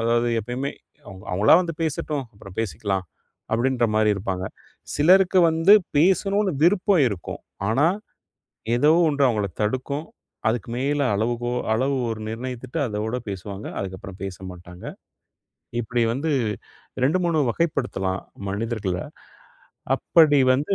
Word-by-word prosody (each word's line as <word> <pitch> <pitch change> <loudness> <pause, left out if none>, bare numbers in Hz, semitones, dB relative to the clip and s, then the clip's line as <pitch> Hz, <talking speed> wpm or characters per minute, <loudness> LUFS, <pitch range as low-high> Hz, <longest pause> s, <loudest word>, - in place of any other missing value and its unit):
அதாவது, 120 +1 +2
எப்பயுமே 125 +5 -4 0.3
அவங்க 95 -1 -11
அவங்களா 100 +9 +5
வந்து 165 -2 -4
பேசட்டும். 150 -2 -2
அப்புறம் 95 -2 -13
பேசிக்கலாம் 95 -1 -2 0.5
அப்படின்ற 120 +2 +2
மாதிரி 110 0 +4
இருப்பாங்க. 95 -2 -3 0.5
சிலருக்கு 185 +5 +5
வந்து 165 +5 +5 0.2
பேசணுன்னு 195 +4 +3
விருப்பம் 185 -3 +4
இருக்கும், 100 -6 -6 0.3
ஆனா, 135 +8 +3 0.9
ஏதோ 145 +5 +4 0.2
ஒண்ணு 145 -2 0
அவங்கள 105 -4 0
தடுக்கும். 130 +7 -2 0.4
அதுக்கு 115 -1 -2
மேல 145 +2 0
அளவுகோ 120 +3 -1 0.2
அளவு 130 +5 +1 0.2
ஒரு 110 -1 -4
நிர்ணயித்துட்டு 125 +2 -5
அதோடு 110 +2 -2
பேசுவாங்க. 100 +1 -6
அதுக்கப்புறம் 95 0 -7
பேச 95 -2 -5
மாட்டாங்க. 90 0 -12 1.0
இப்டி 120 +1 -1
வந்து 145 +6 -2 0.7
2,3 170 +2 +2
வகைப்படுத்தலாம் 120 - -1 0.3
மனிதர்கள்ல 100 -2 -2 1.0
அப்படி 155 -4 +4
வந்து. 145 +9 0
120 Hz, 115 wpm, -23 LUFS, 100-145 Hz, 1.0 s, அவங்களா